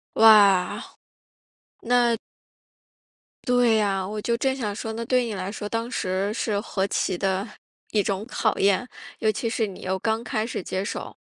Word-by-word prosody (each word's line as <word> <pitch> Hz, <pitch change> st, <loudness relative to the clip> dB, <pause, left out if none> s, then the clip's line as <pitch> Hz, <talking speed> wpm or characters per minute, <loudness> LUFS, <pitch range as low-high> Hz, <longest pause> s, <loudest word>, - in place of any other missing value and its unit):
哇。 205 Hz, -4 st, +6 dB, 1.0 s
那 240 Hz, -1 st, +3 dB, 1.3 s
对 245 Hz, -2 st, +4 dB
呀， 195 Hz, -3 st, 0 dB
我 210 Hz, +2 st, -4 dB
就 235 Hz, +2 st, +1 dB
正 265 Hz, +2 st, 0 dB
想 220 Hz, -6 st, -2 dB
说， 220 Hz, +1 st, -5 dB
那 230 Hz, +1 st, -4 dB
对 250 Hz, +1 st, +2 dB
你 225 Hz, -3 st, -4 dB
来 190 Hz, 0 st, -4 dB
说 205 Hz, 0 st, -5 dB
当 230 Hz, +2 st, -3 dB
时 190 Hz, -3 st, -1 dB
是 215 Hz, -2 st, -1 dB
何 195 Hz, -2 st, -2 dB
其 185 Hz, -2 st, -1 dB
的 195 Hz, 0 st, 0 dB, 0.5 s
一 215 Hz, -, +2 dB
种 200 Hz, +1 st, -2 dB
考 220 Hz, -3 st, 0 dB
验， 200 Hz, +5 st, +2 dB, 0.3 s
尤 220 Hz, -1 st, +2 dB
其 230 Hz, +1 st, -2 dB
是 225 Hz, -1 st, 0 dB
你 195 Hz, -2 st, -9 dB
又 190 Hz, +1 st, -2 dB
刚 220 Hz, +3 st, -1 dB
开 220 Hz, -3 st, -2 dB
始 230 Hz, -, -4 dB
接 190 Hz, +2 st, -3 dB
手， -, -, -6 dB
215 Hz, 180 characters per minute, -24 LUFS, 195-230 Hz, 1.3 s, 哇